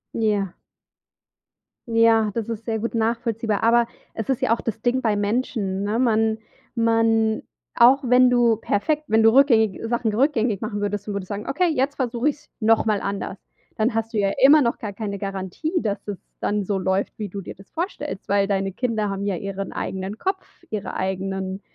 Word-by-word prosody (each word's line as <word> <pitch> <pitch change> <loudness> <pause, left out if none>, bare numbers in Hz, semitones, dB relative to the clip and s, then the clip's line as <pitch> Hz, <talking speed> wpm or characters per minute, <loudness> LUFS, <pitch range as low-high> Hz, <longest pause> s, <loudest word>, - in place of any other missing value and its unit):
Ja. 205 -4 0 1.3
Ja, 225 -2 +4
das 225 -1 -3
ist 230 -1 -5
sehr 225 -1 -1
gut 230 +2 -3
nachvollziehbar, 225 -2 0
aber 235 +1 +4 0.3
es 225 +1 -5
ist 265 - 0
ja - - +3
auch - - -9
das 225 -1 -4
Ding 250 +2 +1
bei 220 -4 +1
Menschen, 205 -2 -1
ne? 210 +3 0
Man 220 -3 +2 0.4
man 225 -1 +2 0.3
auch 260 +4 +6
wenn 250 +1 +6
du 240 -2 +4
perfekt 295 +9 0
wenn 220 -2 +3
du 225 0 +6
rückgängig 230 -7 +4
Sachen 230 -2 0
rückgängig 230 -4 +1
machen 215 -2 -3
würdest 205 0 -3
und 205 - -3
würdest 200 -2 -4
sagen: 205 +2 -5
„Okay, 350 +7 +1
jetzt 275 +1 0
versuche 245 +1 0
ich's 290 - -8
noch 225 0 +4
mal 210 -3 +1
anders“, 200 -1 -4 0.4
dann 220 +2 +1
hast 225 +1 -2
du - - -1
ja 200 -1 +2
immer 290 +3 +8
noch 235 -3 +1
gar 210 -2 -5
keine 200 -1 -4
Garantie, 195 - -4
dass 205 -2 -3
es 205 -2 -4 0.2
dann 205 0 0
so 195 +1 -1
läuft, 190 +1 0
wie 210 - -3
du 200 +1 -6
dir - - -8
das 195 +1 -17
vorstellst, 305 - -5
weil 200 0 +3
deine 195 -1 0
Kinder 220 -1 -1
haben 195 0 -3
ja 200 -2 0
ihren 195 +2 -5
eigenen 190 +2 -4
Kopf, 380 - -4
ihre 210 -2 -4
eigenen 190 0 -3
220 Hz, 190 wpm, -23 LUFS, 200-235 Hz, 1.3 s, immer